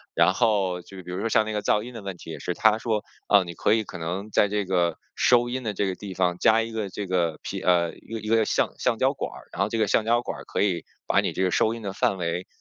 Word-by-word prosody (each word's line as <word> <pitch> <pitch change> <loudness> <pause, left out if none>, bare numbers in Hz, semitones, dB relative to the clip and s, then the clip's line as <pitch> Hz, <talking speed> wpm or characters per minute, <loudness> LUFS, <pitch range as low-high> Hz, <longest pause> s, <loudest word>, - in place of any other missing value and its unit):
然 90 +3 +4
后 100 -6 +1
就 95 +2 -13
比 90 - -8
如 90 - -3
说 115 - -1
像 110 -2 +3
那 110 - -4
个 105 - -1
噪 105 - +2
音 125 - -9
的 115 - -7
问 95 -2 -6
题 85 - -9
也 - - -7
是， 90 - -2
他 110 -1 +4
说： 110 -2 -1 0.3
“啊， 100 -2 +6
你 85 -1 -7
可 105 - +2
以 110 -1 +2
可 90 - -8
能 90 +5 -4
在 105 - +4
这 105 -1 -1
个， 90 -3 +1 0.2
收 120 -1 +4
音 130 +1 -3
的 110 -3 -2
这 100 - 0
个 95 -1 -2
地 100 -1 -8
方 90 -1 +1
加 110 +1 +5
一 115 - -6
个 110 -3 -3
这 100 +2 -5
个 85 -4 0
皮 - - -4
呃， 85 -2 +2
一 - - -18
个 115 - -3
一 110 - -8
个 110 0 +4
橡 - - +1
橡 - - +1
胶 - - +2
管 - - -4
儿， - - -13
然 90 - -3
后 100 - +2
这 115 - -2
个 110 -2 +2
橡 110 - +2
胶 120 +1 +3
管 - - -5
儿， - - -9
可 - - -2
以 95 -4 +1 0.2
把 - - +3
你 - - -1
这 95 - -1
个 90 - +1
收 110 +5 +2
音 115 - -8
的 95 - -4
范 95 - +1
围， 90 0 -3
100 Hz, 330 characters per minute, -25 LUFS, 90-110 Hz, 0.3 s, 啊